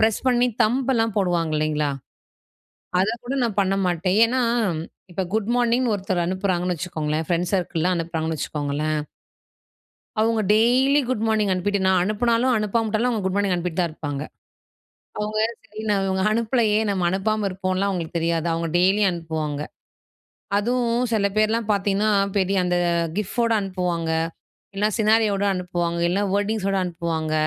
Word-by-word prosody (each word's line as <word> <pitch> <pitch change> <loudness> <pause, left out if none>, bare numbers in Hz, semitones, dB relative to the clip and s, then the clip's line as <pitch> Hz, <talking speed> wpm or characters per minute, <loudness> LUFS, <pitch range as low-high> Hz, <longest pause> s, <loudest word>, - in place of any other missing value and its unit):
Press 220 -1 +2
பண்ணி 245 0 +3 0.2
தம்பெல்லாம் 235 -2 +1
போடுவாங்க 175 -4 0
இல்லைங்களா? 150 -1 0 1.1
அத 195 - +2 0.2
கூட 255 +3 -3
நான் 220 -4 -2
பண்ண 195 0 +1
மாட்டேன். 180 +2 0
ஏன்னா 255 +2 0 0.7
இப்ப 190 - -1
குட் 220 0 0
மார்னிங் 245 +1 +2
ஒருத்தர் 190 -3 -1
அனுப்புறாங்கன்னு 185 -1 -1
வச்சுக்கோங்களேன் 155 -2 -2
ஃப்ரெண்ட்ஸ் 175 +1 0
சர்க்கிள்லாம் 175 0 0
அனுப்புறாங்கன்னு 160 -1 -2
வச்சுக்கோங்களேன் 150 +1 -2 1.2
அவுங்க 225 0 +2
டெய்லி 255 +6 +4
குட் 255 -4 -1
மார்னிங் 215 -2 +1
அனுப்பிட்டு 200 +2 0
நான் 190 -1 +4
அனுப்புனாலும், 235 +4 +1
அனுப்பாம 215 +2 0
விட்டாலும் 220 +3 0
அவுங்க 220 -4 -1
குட் 190 - -1
மார்னிங் 200 -2 +1
அனுப்பிட்டு 175 0 -2
தான் 170 -2 0
இருப்பாங்க. 145 -2 -5 1.0
அவுங்க 210 +1 -2 0.3
சரி 215 +1 -9
நான் 200 -2 +2
இவுங்க 190 0 0
அனுப்பலயே 225 -1 +2
நம்ம 190 -3 0
அனுப்பாம 205 +2 0
இருப்போம்லான் 185 +1 -1
அவுங்களுக்கு 170 -3 -3
தெரியாது. 165 0 0
அவுங்க 165 0 -2
டெய்லியும் 190 +2 +3
அனுப்புவாங்க. 160 -4 -3 1.0
அதுவும் 240 +2 0
சில 200 -2 +2
பேர்லாம் 215 +1 +1
பார்த்தீங்கன்னா, 200 +1 +1 0.3
பெரிய 195 0 +1
அந்த 180 0 +1 0.4
கிஃப்போட 230 +3 0
அனுப்புவாங்க, 180 -4 -2 0.7
இல்ல 205 - +2
சினாரியோட 215 -2 +3
அனுப்புவாங்க, 175 -2 -2
இல்லன்னா 190 +4 +1
வேர்டிங்ஸோட 205 -1 0
அனுப்புவாங்க. 165 -2 -3
195 Hz, 140 wpm, -23 LUFS, 175-220 Hz, 1.2 s, டெய்லி